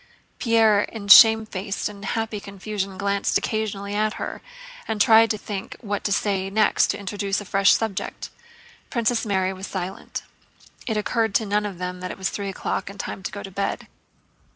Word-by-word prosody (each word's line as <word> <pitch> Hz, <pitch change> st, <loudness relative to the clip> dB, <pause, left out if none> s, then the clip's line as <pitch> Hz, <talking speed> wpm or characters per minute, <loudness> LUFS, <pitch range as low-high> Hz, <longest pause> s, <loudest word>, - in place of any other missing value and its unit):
Pierre 225 Hz, -4 st, +4 dB
in 210 Hz, -1 st, -6 dB
shamefaced 215 Hz, -2 st, +6 dB
and 205 Hz, -1 st, -10 dB
happy 220 Hz, +1 st, -2 dB
confusion 200 Hz, -1 st, -5 dB
glanced 200 Hz, +1 st, +1 dB
occasionally 205 Hz, -2 st, -3 dB
at 215 Hz, +1 st, +1 dB
her, -, -, -6 dB, 0.5 s
and 220 Hz, -1 st, -2 dB
tried 225 Hz, +1 st, +6 dB
to 215 Hz, -, 0 dB
think 200 Hz, -2 st, -6 dB
what 205 Hz, -3 st, -4 dB
to 205 Hz, -, 0 dB
say 195 Hz, -1 st, 0 dB
next 215 Hz, +2 st, +3 dB
to -, -, -2 dB
introduce 200 Hz, 0 st, -2 dB
a 205 Hz, -, -8 dB
fresh 195 Hz, +1 st, +4 dB
subject. 220 Hz, -4 st, -3 dB, 0.6 s
Princess 235 Hz, -2 st, 0 dB
Mary 190 Hz, -2 st, +1 dB
was 190 Hz, +1 st, -7 dB
silent. 190 Hz, 0 st, -5 dB, 0.6 s
It 220 Hz, -3 st, 0 dB
occurred 220 Hz, 0 st, 0 dB
to 220 Hz, -, +3 dB
none 210 Hz, +1 st, 0 dB
of 195 Hz, -4 st, -8 dB
them 180 Hz, 0 st, -5 dB
that 185 Hz, 0 st, -5 dB
it -, -, -7 dB
was 190 Hz, 0 st, -2 dB
three 200 Hz, -1 st, -4 dB
o'clock 190 Hz, -, -3 dB
and 200 Hz, 0 st, -11 dB
time 195 Hz, -, -5 dB
to -, -, -5 dB
go 200 Hz, -, -7 dB
to 195 Hz, -, -8 dB
bed. 200 Hz, +2 st, -3 dB
200 Hz, 180 wpm, -23 LUFS, 195-215 Hz, 0.6 s, shamefaced